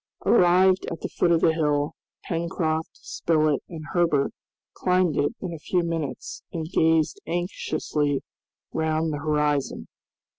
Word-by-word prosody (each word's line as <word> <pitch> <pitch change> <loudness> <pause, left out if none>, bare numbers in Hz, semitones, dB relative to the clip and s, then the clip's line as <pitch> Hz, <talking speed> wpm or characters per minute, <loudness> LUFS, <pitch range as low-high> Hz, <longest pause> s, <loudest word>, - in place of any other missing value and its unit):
Arrived 185 -1 +5
at 165 - -5
the - - -3
foot 175 - +1
of 165 -1 +3
the 165 - +4
hill, 150 -2 +1 0.3
Pencroft, 165 -2 -1
Spilett, 155 -3 0
and 165 -2 -7
Herbert 165 -6 +2 0.4
climbed 180 -3 +2
it 145 - +1
in 180 -3 -4
a 165 - -7
few 175 +3 0
minutes, 160 -6 -4
and 160 -2 -3
gazed 160 - +2
anxiously 155 -5 -1 0.5
round 160 0 0
the 145 - -3
horizon. 150 -2 0
160 Hz, 135 wpm, -25 LUFS, 150-175 Hz, 0.5 s, Arrived